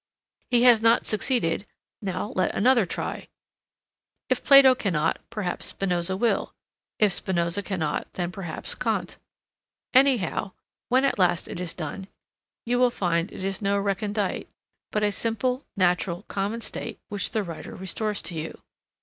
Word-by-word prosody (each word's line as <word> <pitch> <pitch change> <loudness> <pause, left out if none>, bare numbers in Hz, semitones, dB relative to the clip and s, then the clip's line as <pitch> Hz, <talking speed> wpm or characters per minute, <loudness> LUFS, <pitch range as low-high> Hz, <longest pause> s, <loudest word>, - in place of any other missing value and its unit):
He 240 -1 +4
has 240 -3 +7
not 230 +1 +4
succeeded; 210 -4 0 0.3
now 200 +1 -3
let 185 - +1
another 240 -3 +4
try. - - -4 1.0
If - - 0
Plato 275 -2 +8
cannot, 170 -10 0
perhaps 210 -6 -3
Spinoza 180 -1 0
will. 235 +3 0 0.4
If 210 -3 +4
Spinoza 175 +1 +1
cannot, 165 -7 -3
then 175 -1 -2
perhaps 180 -4 -4
Kant. 215 -7 -2 0.8
Anyhow, 250 -8 +3 0.4
when 260 +2 +4
at 275 - 0
last 175 -2 +2
it - - -6
is 180 -2 -5
done, 180 +4 -6 0.6
you 245 +1 +1
will 250 0 +5
find 175 -6 -1
it - - -7
is 195 +1 -2
no 200 0 +1
recondite, 200 0 -1 0.4
but 210 - 0
a 205 - +3
simple, 240 +5 -1
natural, 180 0 +1
common 205 +4 -3
state 230 -1 -5
which 205 -1 -2
the 220 - -1
writer 170 -4 -8
restores 205 +3 -3
to - - -5
you. 160 0 -5
200 Hz, 145 wpm, -25 LUFS, 180-230 Hz, 1.0 s, Plato